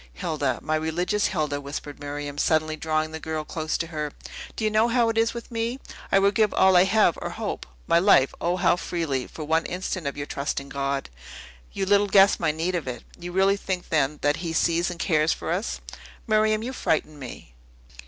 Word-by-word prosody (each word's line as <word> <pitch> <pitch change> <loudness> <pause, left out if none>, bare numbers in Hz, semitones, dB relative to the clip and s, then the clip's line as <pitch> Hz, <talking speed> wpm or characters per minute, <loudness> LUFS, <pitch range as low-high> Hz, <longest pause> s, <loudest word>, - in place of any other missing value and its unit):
"Hilda, 150 -8 -1
my 155 - -1
religious 175 +6 0
Hilda," 150 -5 -1
whispered 145 +1 -7
Miriam, 145 0 -5
suddenly 155 0 +2
drawing 155 0 -1
the 160 - -6
girl 160 -1 -3
close 155 0 -2
to 165 - -2
her, 150 -3 -4 0.4
"do - - -4
you 215 - +2
know 215 +2 +4
how 235 -1 +2
it 225 - -2
is 225 +1 +1
with 235 0 -8
me? 230 +2 -2 0.3
I - - +5
would 200 +1 +4
give 215 0 +3
all 190 -1 +5
I 180 +1 +7
have 200 -4 +3
or - - -3
hope - - -5 0.2
my 170 - +4
life, 170 -8 +5
O 175 +1 +1
how 175 -1 +3
freely 160 -8 -2
for 155 - -8
one 160 +2 +1
instant 180 -3 -3
of 140 - -4
your 145 - -3
trust 140 0 -2
in 140 0 -11
God! 140 - -2 0.6
You 195 - -2
little 205 +1 +4
guess 195 0 +5
my 165 - +1
need 165 +4 -2
of 170 -6 -2
it. 125 -1 -5 0.2
You 175 0 -6
really 195 +2 +3
think, 185 -2 -4
then, 150 -2 +1
that 145 +1 +2
He 165 -2 -4
sees 170 +2 +2
and 175 -1 -7
cares 155 -2 +2
for - - -5
us?" 190 +7 -2 0.4
"Miriam, 215 -1 +2
you 255 +3 -4
frighten 155 - -1
me." 120 - -9
165 Hz, 210 wpm, -25 LUFS, 150-195 Hz, 0.6 s, I